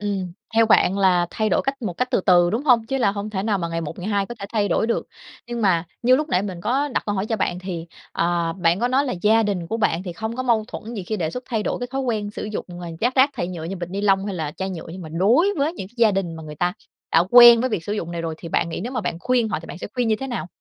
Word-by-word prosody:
Ừm, 195 -4 -3 0.2
theo 225 0 +5
bạn 195 -2 +4
là 180 -3 +3
thay 215 -1 -1
đổi - - +2
cách 270 -1 -3
một 195 - -2
cách 250 +9 -2
từ 245 - +2
từ, 175 -2 +4
đúng 235 +8 -2
hông? 235 -5 +4
Chứ 270 +3 -1
là 205 -6 +2
không 205 +1 -5
thể 190 -2 -2
nào 210 -2 0
mà 170 -2 -2
ngày 165 0 -2
một 165 0 -6
ngày 185 +3 -4
hai 200 -2 0
có 240 - -7
thể 200 - -6
thay 210 -3 +1
đổi 195 - +1
được. 235 - -1 0.4
Nhưng 240 -1 -4
mà 180 -5 +3 0.2
như 255 +2 +5
lúc 305 +2 -2
nãy 185 - +1
mình 185 -4 -5
có 265 +8 0
đặt - - -1
câu 205 - 0
hỏi 195 +1 -1
cho 225 - -1
bạn 180 -3 -1
thì, 180 -3 -5 0.3
ờ, 170 -1 0
bạn 175 +1 +1
có 245 - +2
nói 265 +3 +2
là 250 - -1
gia 220 +2 +5
đình 195 -5 -2
của 225 - -2
bạn 185 -6 0
thì 180 -2 -6
không 220 +6 -5
có 255 - -2
mâu 230 -4 +2
thuẫn 230 +2 -7
gì 205 - -4
khi 215 +4 -3
đề 165 -5 -2
xuất 250 +8 -6
thay 225 -4 -1
đổi - - -2
cái 245 - -3
thói 270 +1 -2
quen 220 -5 -2
sử - - -6
dụng, 210 0 -4
ờ, 175 - -6
dác 245 +3 +1
rác 265 +2 +5
thải 210 -10 -3
nhựa 170 -3 -6
như 185 +4 -4
bịch 175 -1 -6
ni 195 +2 -3
lông 195 -1 +2
hay 200 - -3
là 155 -4 -3
chai 190 0 -3
nhựa, 170 -3 -7
nhưng 185 - -8
mà 160 - -8
đối 200 - +3
với 290 +3 +1
những 195 - -7
cái - - -28
gia 230 -2 +5
đình 190 -4 -2
mà 160 - -8
người 150 -1 -9
ta 175 +2 0 0.4
đã 165 +1 +5
quen 240 -1 +9
với 255 +1 0
việc 170 -6 -2
sử 205 - -3
dụng 170 -5 -3
này 170 -1 -4
rồi 165 -1 -3
thì 170 - -8
bạn 165 - 0
nghĩ 165 - -4
nếu 240 +7 -5
mà 245 - -1
bạn 170 -4 -3
khuyên 245 -1 +1
họ 155 - -2
thì 165 - -12
bạn - - -8
sẽ - - -5
khuyên 245 -3 0
như 220 - +2
thế 270 - -3
nào? 240 -6 -4
205 Hz, 330 wpm, -22 LUFS, 175-235 Hz, 0.4 s, quen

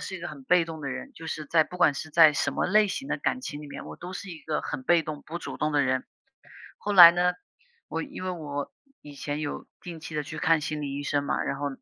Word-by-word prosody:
是 190 - -5
一 - - -11
个 175 - -5
很 145 -3 -10
被 180 +3 +4
动 160 -1 -8
的 140 - -4
人。 275 - -6
就 165 -6 -10
是 155 -1 -4
在 160 +2 +4
不 180 - -10
管 160 -5 +5
是 160 - -6
在 160 -1 +7
什 - - 0
么 - - 0
类 210 +2 +4
型 270 +8 -4
的 - - 0
感 255 - -1
情 150 - -6
里 150 - -9
面， - - -8
我 - - -9
都 180 +2 -8
是 195 +2 -7
一 165 - -8
个 150 0 -2
很 - - -5
被 170 +4 +4
动 155 -2 -6
不 170 +2 -6
主 - - -7
动 155 0 -1
的 145 -1 +3
人。 130 -1 0 0.7
后 205 0 -3
来 170 -3 +12
呢， 180 +1 +2 0.5
我 - - -3
因 280 -9 -8
为 185 - -2
我 145 -4 -5 0.3
以 145 - -11
前 145 +1 -4
有 150 -2 -5
定 170 -2 -8
期 155 -1 -8
地 150 - -1
去 155 +2 -8
看 165 0 +3
心 150 0 -3
理 140 -1 -4
医 145 - -4
生 145 0 0
嘛， 140 - -1
然 - - -2
后 145 +1 -2
160 Hz, 300 characters per minute, -27 LUFS, 145-175 Hz, 0.7 s, 来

